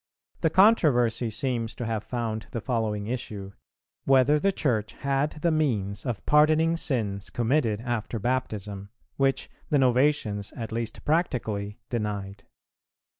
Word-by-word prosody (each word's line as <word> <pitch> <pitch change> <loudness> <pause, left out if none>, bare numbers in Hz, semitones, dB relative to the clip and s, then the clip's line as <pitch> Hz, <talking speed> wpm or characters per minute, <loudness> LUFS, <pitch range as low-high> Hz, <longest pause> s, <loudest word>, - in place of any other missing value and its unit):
[385:2] - - -32
The 160 - +3
controversy 135 - +4
seems 115 0 -2
to 120 - -4
have 110 -2 -2
found 115 -3 -3
the 115 - -4
following 110 -4 -1
issue, 105 -4 -5 0.5
whether 135 +2 +5
the 195 +5 +2
Church 115 - -1
had 140 +2 -1
the 170 - +3
means 110 -9 0
of 120 -4 -3
pardoning 155 +2 +4
sins 110 -11 -2
committed 120 -3 +1
after 120 -1 -3
Baptism, 105 -5 -3 0.3
which 135 -1 +1 0.2
the 145 - +3
Novatians, 125 -6 +2
at 115 -2 -5
least 115 0 -4
practically, 110 - -1
denied. 100 -4 -3
120 Hz, 130 wpm, -26 LUFS, 105-140 Hz, 0.5 s, whether